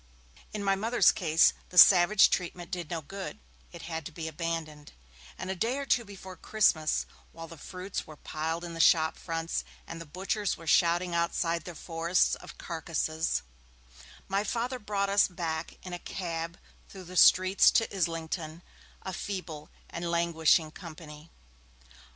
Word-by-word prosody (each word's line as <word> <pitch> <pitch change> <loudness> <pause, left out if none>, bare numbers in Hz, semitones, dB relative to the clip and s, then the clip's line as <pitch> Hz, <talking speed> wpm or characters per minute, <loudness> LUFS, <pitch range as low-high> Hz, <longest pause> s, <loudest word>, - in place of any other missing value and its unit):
In 210 -1 -4
my 195 0 +2
Mother's 225 +5 +4
case, 165 -2 +3 0.2
the 180 - -9
savage 185 +3 +8
treatment 175 0 -3
did 175 -4 -4
no 165 -2 -4
good; 195 - -7 0.3
it - - -10
had 160 -1 -5
to - - -10
be 160 +1 -6
abandoned, 160 -2 -5 0.4
and 185 - -4
a - - -3
day 230 +8 -1
or 280 - -3
two 245 -3 +2
before 190 -3 -10
Christmas, 165 -9 +1 0.3
while 165 0 -9
the 165 - -11
fruits 185 +5 -6
were 155 - -11
piled 160 +3 -4
in 170 -1 -6
the 165 - -7
shop 160 -1 +4
fronts 165 0 -3 0.2
and 165 0 -8
the 165 - -10
butchers 195 +5 -2
were 165 - -12
shouting 170 +2 +3
outside 170 0 0
their 175 - -8
forests 170 +2 +1
of - - -8
carcases, 160 -1 -2 0.8
my 195 +1 0
Father 245 +4 -2
brought 205 -2 -1
us 200 +1 +4
back 165 -3 -4
in 180 - -7
a 175 - -4
cab 170 -2 -5 0.3
through 190 -1 -10
the 180 +1 -11
streets 185 +2 +6
to 225 -3 +1
Islington, 165 -1 -3 0.4
a 190 - -5
feeble 175 -6 -6 0.2
and 170 0 -5
languishing 170 -2 +2
company. 155 -2 -11
170 Hz, 160 wpm, -29 LUFS, 165-190 Hz, 0.8 s, savage